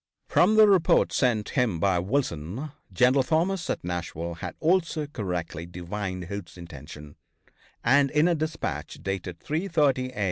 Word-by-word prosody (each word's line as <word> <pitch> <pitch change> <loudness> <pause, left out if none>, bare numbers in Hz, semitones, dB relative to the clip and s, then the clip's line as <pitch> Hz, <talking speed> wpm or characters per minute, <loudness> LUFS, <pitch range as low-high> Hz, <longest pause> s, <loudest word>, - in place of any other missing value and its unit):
From 215 - +3
the 215 -1 +8
reports 190 -5 +3
sent 115 -5 +1
him 115 -10 0
by 90 0 +2
Wilson, 100 - -2 0.2
General 125 +8 +4
Thomas 165 +5 0
at - - -2
Nashville 85 -1 -4
had 80 - -7
also 165 -2 +1
correctly 90 - -4
divined 90 +1 -5
Hood's 90 0 -7
intention, 75 -3 -11 0.7
and 140 +3 +4
in 150 +4 +3
a 175 - +3
dispatch 155 0 -3
dated 95 -3 -4
at - - -25
3:30 150 -6 +1
a. - - -6
110 Hz, 145 wpm, -26 LUFS, -, 0.7 s, the